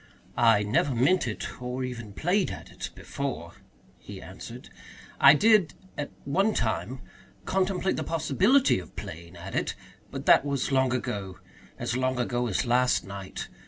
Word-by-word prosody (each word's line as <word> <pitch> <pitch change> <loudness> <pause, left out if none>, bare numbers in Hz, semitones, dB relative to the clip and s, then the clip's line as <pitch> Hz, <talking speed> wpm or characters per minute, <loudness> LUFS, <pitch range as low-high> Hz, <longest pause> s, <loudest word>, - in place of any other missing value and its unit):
"I 115 -3 +5
never 120 +5 +1
meant 135 +6 +3
it 110 +2 -5
or 125 +1 -3
even 115 -5 -6
played 180 - +1
at - - -8
it - - -6
before," 130 -12 -5 0.5
he - - -10
answered. - - -10 0.5
"I 140 +2 +9
did 210 -2 +4 0.2
at 145 - -4 0.2
one 195 +10 +2
time 120 +3 -1 0.4
contemplate 190 0 0
the - - -1
possibility 185 - +3
of 90 - -12
playing 85 +2 -8
at 90 +3 -8
it. - - -1 0.3
But - - -6
that - - +6
was 140 -1 -1
long 130 -1 +3
ago 100 -6 -3 0.4
as 120 - -2
long 130 0 0
ago 120 0 0
as 100 - 0
last 125 +1 +3
night. 100 -1 -7
130 Hz, 155 wpm, -27 LUFS, 110-155 Hz, 0.5 s, I